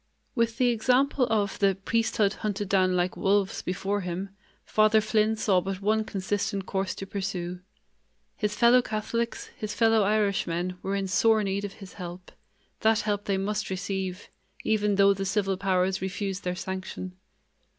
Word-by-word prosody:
With 230 -1 0
the 250 -1 +3
example 250 +3 +2
of 205 -3 0
the 195 -1 +3
"priesthood 210 0 +1
hunted 205 -2 -2
down 185 -1 +3
like 180 0 0
wolves" 195 0 +1
before 195 +3 -2
him, 180 +2 -4 0.4
Father 215 0 +4
Flynn 215 0 +2
saw 195 -4 +2
but 190 0 -4
one 215 +2 +1
consistent 200 0 -2
course 195 -1 -2
to 195 - -6
pursue. 190 -3 -4 0.8
His 210 -1 -2
fellow 240 +3 +6
Catholics, 230 +1 -3
his 210 -1 -5
fellow 225 -1 +4
Irishmen, 190 -4 0
were 195 +1 -2
in 195 -1 -1
sore 220 +2 +3
need 200 +1 -1
of 200 - -6
his 195 -2 -12
help; 180 0 -8 0.5
that 220 0 +3
help 205 -1 -2
they 195 -1 +1
must 200 +2 -2
receive, 190 0 -4 0.3
even 210 -2 +2
though 200 0 +5
the 195 0 -4
civil 195 0 0
powers 185 0 +1
refused 190 0 -3
their 180 0 -2
sanction. 185 0 -5
200 Hz, 160 wpm, -27 LUFS, 190-215 Hz, 0.8 s, fellow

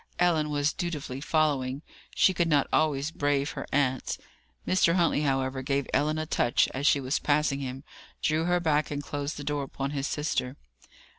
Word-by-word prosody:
Ellen 165 -4 +2
was 145 0 +1
dutifully 150 -7 -4
following. 145 -3 0 0.3
She 190 - +4
could 170 -1 +1
not 145 -4 +3
always 150 -1 +1
brave 145 -1 0
her - - -6
aunt. 130 -2 0 0.5
Mr. 185 -2 +3
Huntley, 170 -4 +2
however, 135 -2 0
gave 135 +1 0
Ellen 150 +3 +2
a 155 - -2
touch 120 -5 +2
as 140 +3 0
she 145 - +5
was 135 +2 -1
passing 145 -1 +1
him, 135 0 -5 0.4
drew 155 +1 +1
her 180 0 +2
back, 155 -3 +1
and 145 -1 -4
closed 145 +1 -4
the 145 - -6
door 145 0 -1
upon 135 0 -4
his 140 -1 -2
sister. 145 -3 -2
145 Hz, 175 wpm, -28 LUFS, 135-155 Hz, 0.5 s, she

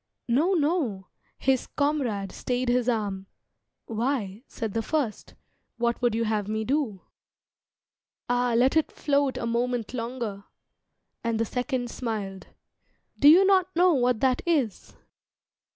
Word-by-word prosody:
"No, 295 +11 +2
no!" 290 - 0 0.3
His 265 -1 +1
comrade 255 -10 -1
stayed 250 0 -2
his 245 0 +2
arm. 200 -4 -2 0.6
"Why," 225 -3 -2
said 225 -5 -5
the 225 - 0
first, 255 -3 -3 0.4
"What 235 0 0
would 240 -3 +2
you 230 - +1
have 215 -2 -1
me 220 +1 -1
do?" 245 -6 -1 1.3
"Ah, 245 -1 +1
let 255 +4 +3
it 315 - +2
float 280 -2 0
A - - -3
moment 240 0 -1
longer!" 230 -4 -4 0.8
And 230 -1 -1
the 230 - +2
second 250 +1 -2
smiled. 205 -6 -4 0.7
"Do 285 - +6
you 360 +5 +8
not 375 -2 +3
know 355 +1 +5
what 250 -4 +1
that 255 -2 +2
is?" 280 - -1
245 Hz, 135 wpm, -26 LUFS, 220-280 Hz, 1.3 s, you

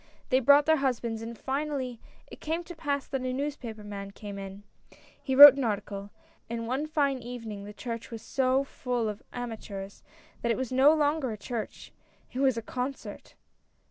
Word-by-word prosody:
They 260 -2 +4
brought 285 +3 +6
their 315 0 +4
husbands, 235 -5 -1
and 230 0 -7
finally 270 -3 -3 0.3
it - - -13
came 325 +3 -2
to 350 0 -10
pass 285 -3 -2
that 270 -2 -3
a 255 0 -2
newspaper 255 -5 -4
man 200 -1 -6
came 200 0 -8
in. 195 +1 -8 0.6
He 265 - -1
wrote 290 +1 +13
an 275 -1 -3
article; 200 -2 -3 0.4
and 230 0 -3
one 265 +6 -2
fine 285 -4 +1
evening 225 -4 -7
the 205 - -8
church 230 +1 -6
was 225 -2 -8
so 265 0 +1
full 250 -4 -2
of 210 -1 -5
amateurs 215 -5 -7 0.4
that 235 - +1
it - - 0
was 260 -2 -3
no 265 +3 +6
longer 300 -3 +1
a 215 - -5
church 220 +1 -6 0.2
— - - -32
it 255 - -4
was 265 -3 +3
a 230 - -3
concert." 255 +4 -6
250 Hz, 185 wpm, -28 LUFS, 220-275 Hz, 0.6 s, wrote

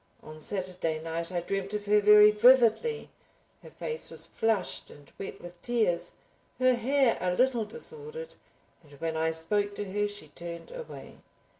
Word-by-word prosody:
On 155 0 -11
Saturday 180 -3 -2
night 165 +2 -4
I 175 -1 -1
dreamt 195 +3 -3
of 205 -1 -4
her 210 0 +4
very 210 0 +8
vividly. 250 - +4 0.5
Her - - -12
face 470 0 -5
was - - -5
flushed 220 -4 -1
and 145 -1 -16
wet 195 0 -6
with 175 0 -12
tears, 220 -8 0 0.4
her 255 0 +4
hair 255 +1 +2
a 180 0 0
little 250 -2 +2
disordered, 470 - -7 0.5
and 145 -3 -19
when 160 +3 -3
I 160 0 +1
spoke 200 +6 -1
to 200 -2 -5
her 205 0 +1
she 205 -7 -9
turned 170 - -8
away. - - -9
205 Hz, 160 wpm, -29 LUFS, 170-240 Hz, 0.5 s, very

